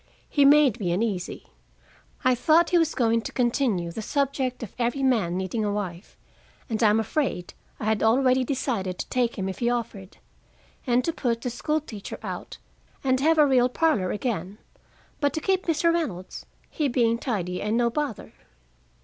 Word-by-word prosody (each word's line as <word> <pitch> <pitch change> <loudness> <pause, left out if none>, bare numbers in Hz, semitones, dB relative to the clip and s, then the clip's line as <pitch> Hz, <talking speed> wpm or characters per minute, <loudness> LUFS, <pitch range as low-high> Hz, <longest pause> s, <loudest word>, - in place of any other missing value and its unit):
He 285 -2 +3
made 280 -5 +5
me 180 -5 -1
uneasy: 190 -1 -2 0.8
I 255 -1 +4
thought 315 +7 +3
he 350 - +5
was 325 -1 +1
going 230 -2 +2
to - - -6
continue 240 -8 0
the 220 - -5
subject 265 0 -1
of 215 - -8
every 245 +3 0
man 215 -10 +1
needing 190 +4 -2
a 205 - 0
wife, 195 -3 -5 0.5
and 225 -2 -2
I'm 215 -1 +4
afraid 225 - -2 0.3
I - - -4
had 220 -1 +1
already 255 +3 +3
decided 230 -8 -2
to - - -5
take 245 -2 0
him 190 -1 -2
if 190 - -5
he 235 - +1
offered, 220 -5 -4 0.7
and 245 +1 +2
to 330 - 0
put 235 -6 -1
the 250 - -3
school 305 +6 -1
teacher 215 -9 -8
out - - -6 0.5
and 260 -1 +2
have 320 +4 +3
a 300 - +7
real 255 -3 +3
parlor 250 - +1
again, 205 -4 -3 0.6
but 285 -2 +1
to - - -1
keep 380 +3 0
Mr. 335 +1 +2
Reynolds, 210 - -4 0.2
he 300 - 0
being 235 -2 +1
tidy 180 -9 -3
and 215 +2 0
no 240 -1 +2
bother. 290 -4 -4
240 Hz, 175 wpm, -25 LUFS, 210-280 Hz, 0.8 s, a